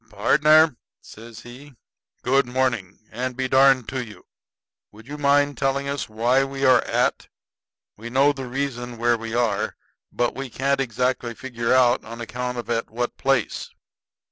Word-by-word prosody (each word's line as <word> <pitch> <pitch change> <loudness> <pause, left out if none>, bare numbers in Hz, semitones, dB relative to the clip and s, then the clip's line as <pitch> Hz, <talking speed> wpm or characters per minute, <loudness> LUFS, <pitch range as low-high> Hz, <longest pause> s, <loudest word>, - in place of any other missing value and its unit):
"Pardner," 150 +7 +4 0.2
says 115 0 -13
he, 130 +4 -13 0.5
"good 135 0 +2
morning, 125 -7 -1
and 125 +2 -4
be 130 -1 -1
darned 130 -2 +4
to 130 -1 -3
you. 105 -3 -13 0.7
Would 110 +2 -16
you 145 - -7
mind 145 -1 +2
telling 135 +1 0
us 140 -4 -3
why 120 +5 +2
we 135 0 -3
are 130 -2 +6
at? - - 0 0.7
We 115 +3 -8
know 135 +4 +3
the 135 -2 -7
reason 120 -2 -4
we 120 +1 -2
are 120 - +2 0.3
where, 100 -3 -2 0.4
but 120 -1 -1 0.2
can't 135 +1 0
exactly 125 -1 -2
figure 115 -1 -3
out 125 -1 +4
on 115 +2 -9
account 125 +2 -4
of 120 - -5
at 115 0 -1
what 120 +2 -3
place." 135 -5 -1
125 Hz, 155 wpm, -23 LUFS, 120-135 Hz, 0.7 s, are